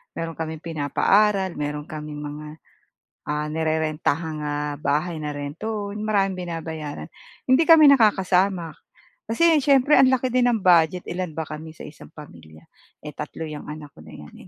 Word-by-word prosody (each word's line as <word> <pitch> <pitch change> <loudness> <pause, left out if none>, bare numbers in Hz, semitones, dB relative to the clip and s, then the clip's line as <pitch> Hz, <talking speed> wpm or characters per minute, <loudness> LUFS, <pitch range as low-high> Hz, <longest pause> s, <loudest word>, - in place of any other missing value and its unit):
meron 165 -1 -5
kaming 160 -1 -5
pinapaaral, 190 +5 +1
meron 150 0 -3
kaming 150 -1 -7
mga, 150 +1 -7 0.8
ah, 150 0 -2
nirerentahang 155 0 -1
ah, 145 0 -2
bahay 155 +3 -1
na 150 -1 -4
rent 145 +2 -6
to 215 -2 -4
own, 210 +1 -5
maraming 195 -3 +1
binabayaran. 160 -3 -6 0.4
Hindi 260 +5 +5
kami 320 -3 +8
nakakasama, 190 - +2 0.5
kasi 320 +7 +3
siyempre 280 +1 +4
ang 260 0 +6
laki 260 0 +1
din 245 -1 +3
ng 225 - 0
budget 175 0 +3
ilan 180 -1 -4
ba 160 -1 -5
kami 155 +1 -8
sa - - -11
isang 150 - -13
pamilya, 80 - -14 0.4
eh 150 - -7
tatlo 150 +2 -6
yang 150 -1 -8
anak 150 -1 -8
ko 75 - -14
na - - -13
yan 75 -1 -12
160 Hz, 160 wpm, -23 LUFS, 150-200 Hz, 0.8 s, kami